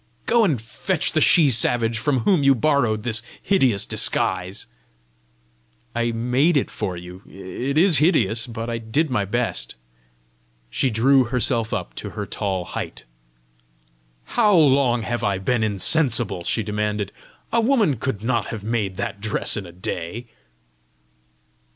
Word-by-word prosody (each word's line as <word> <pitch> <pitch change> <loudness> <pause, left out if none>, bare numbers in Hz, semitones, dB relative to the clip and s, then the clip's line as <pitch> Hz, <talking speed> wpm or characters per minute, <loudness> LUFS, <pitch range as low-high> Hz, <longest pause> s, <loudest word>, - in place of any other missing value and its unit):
Go 235 0 +3
and 155 - +1
fetch 145 - -2
the 155 - +1
she 155 -4 +5
savage 115 -1 +2
from 130 0 0
whom 175 - +2
you 140 -1 +4
borrowed 120 -5 +1
this 115 -2 -2 0.2
hideous 130 - +2
disguise." 95 +1 0 1.3
"I 120 0 0
made 125 +8 +1
it 140 - -1
for 95 -5 -4
you. 90 +2 -10
It 120 +9 -5
is 170 -4 +5
hideous, 115 - +2
but 115 -1 -6
I 115 -1 -3
did 130 +7 -1
my 105 -5 0
best." 100 - -2 1.0
She 135 - +1
drew 130 +4 +3
herself 120 -2 +1
up - - -4
to - - -5
her - - -3
tall 95 -3 -3
height. - - -7 1.2
"How 210 - +2
long 135 -6 +3
have 120 +2 -3
I 100 -1 0
been 115 +5 -1
insensible?" 110 - +1
she 115 - 0
demanded. 105 -1 -2 0.4
"A 230 - +3
woman 225 - +2
could 110 -3 -4
not 120 0 0
have 110 -3 -6
made 105 -4 -2
that 100 - -5
dress 110 0 0
in 100 -4 -5
a - - -11
day!" 90 +5 -5
115 Hz, 145 wpm, -22 LUFS, 105-140 Hz, 1.3 s, she